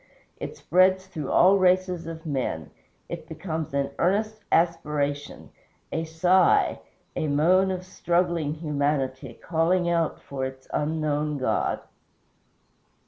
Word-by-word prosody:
It - - -6
spreads 185 +2 +3
through 160 -7 -6
all 195 +2 +5
races 180 -2 +2
of 165 0 -7
men; 130 - -3 0.4
it - - -7
becomes 160 -4 -4
an 140 0 0
earnest 215 +5 +1
aspiration, 150 -4 0 0.4
a 160 - -2
sigh, 175 +3 +3 0.4
a 155 - -1
moan 175 +7 +3
of 185 -1 -3
struggling 170 -4 0
humanity, 140 -5 -2
crying 170 +2 +1
out 165 -2 0
for 135 -1 -6
its 130 0 -8
Unknown 150 -1 -1
God. 130 - 0
160 Hz, 115 wpm, -26 LUFS, 145-180 Hz, 0.4 s, all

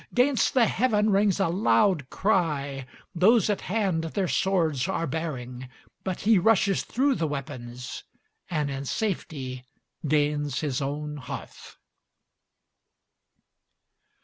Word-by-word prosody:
'Gainst 255 +2 +3
the 245 -3 +6
heaven 215 -3 +2
rings 200 -1 +3
a - - +3
loud 180 - +2
cry, 145 -9 0 0.3
those 210 +4 +4
at 205 - -2
hand 190 -5 0
their 185 +3 -1
swords 165 -7 +1
are 180 -3 -1
baring 130 -5 -5 0.3
But 185 -2 -3
he 215 -1 +4
rushes 195 0 +3
through 275 +3 +1
the 165 -10 -1
weapons, 125 -4 -6 0.5
and 150 -4 -1
in 135 0 -4
safety 135 - -3 0.4
gains 145 -2 +1
his 145 -3 -1
own 150 +2 -3
hearth. 125 -3 -9
165 Hz, 115 wpm, -26 LUFS, 140-200 Hz, 0.5 s, the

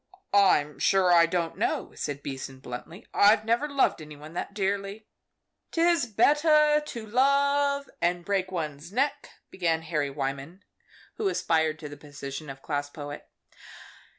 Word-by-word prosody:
_" - - -30 0.2
"I'm 165 -8 +4
sure 190 -2 +3
I 170 -1 +6
don't 170 -1 -2
know," - - -1
said 145 0 -5
Beason, 135 -1 -6
bluntly; 130 +9 -9
"I 205 +2 +6
never 235 +7 +1
loved 275 - +1
any 150 -1 -10
one 150 +2 -12
that 175 - -4
dearly." 200 +1 -2 0.6
"'Tis 335 -5 +2
better 300 +5 +4
to 235 -6 -7
love 280 +4 +2
and 175 0 0
break 190 -1 -1
one's 155 -2 -5
neck," 270 +7 -1 0.2
began 165 -3 0
Harry 150 -3 -1
Wyman, 140 +6 -5 0.5
who 430 - 0
aspired 160 - +1
to 155 - -8
the 145 0 -10
position 145 0 -8
of 135 0 -9
class 145 -2 -2
poet. 145 0 -8
175 Hz, 150 wpm, -27 LUFS, 150-240 Hz, 0.6 s, I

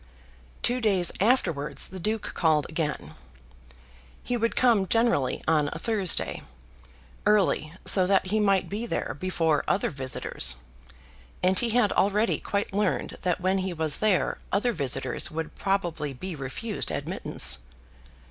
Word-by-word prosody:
Two 250 +1 +2
days 195 -6 +3
afterwards 180 - +1
the 190 - -8
Duke 215 +4 -1
called 155 -3 +2
again. 150 - -3 1.1
He 245 - -1
would 230 -1 0
come 225 -6 +3
generally 230 - +1
on 150 -2 +3
a - - -5
Thursday, 200 -1 0 0.9
early, 195 -6 +2
so 185 -2 +5
that 195 -1 +3
he 210 +4 0
might 195 -2 +2
be 220 +4 -4
there - - -3
before 165 -5 +1
other 195 - +1
visitors; 130 - -2 0.9
and 185 +1 +3
he 240 - +1
had 235 -2 +3
already 210 +3 +2
quite 200 -1 -2
learned 205 -1 -1
that 180 -1 -1
when 190 +1 +1
he 185 -1 -2
was 155 -3 +1
there 210 -4 +1
other 210 +5 +1
visitors 135 - -1
would 160 -1 -5
probably 175 -7 -2
be 180 +7 -6
refused 145 - -3
admittance. - - 0
185 Hz, 140 wpm, -26 LUFS, 155-210 Hz, 1.1 s, so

